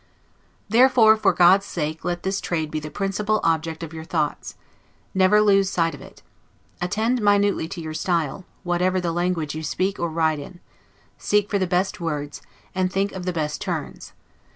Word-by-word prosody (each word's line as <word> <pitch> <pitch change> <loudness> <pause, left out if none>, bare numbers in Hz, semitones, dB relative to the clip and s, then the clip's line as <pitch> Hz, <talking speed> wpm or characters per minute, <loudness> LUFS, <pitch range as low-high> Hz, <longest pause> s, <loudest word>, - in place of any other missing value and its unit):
Therefore, 230 -1 +6
for 210 -3 +2
God's 185 +3 +5
sake, 155 -1 -4
let 175 -1 -3
this 190 +1 -1
trade 160 -3 -2
be 155 - -2
the 155 0 -7
principal 205 +5 -1
object 165 0 0
of 160 -1 -7
your 160 0 -7
thoughts; 155 -3 -2 0.6
never 190 +3 +4
lose 195 -2 +4
sight 165 -4 0
of 145 - -10
it. - - -15 0.6
Attend 220 +7 0
minutely 205 -4 +2
to 180 +1 -7
your 155 -1 -6
style, 170 0 -1 0.2
whatever 180 +1 +1
language 175 -3 -1
you 155 - -5
speak 185 +5 -2
or 170 - -1
write 160 -1 0
in; 175 +5 -10 0.6
seek 205 0 +1
for 200 - +1
the 185 - 0
best 185 +2 0
words, 145 -3 -4 0.3
and 185 -1 0
think 195 +1 0
of 185 -1 -7
the 180 - 0
best 150 -3 -3
turns. - - -5
180 Hz, 175 wpm, -23 LUFS, 160-195 Hz, 0.6 s, Therefore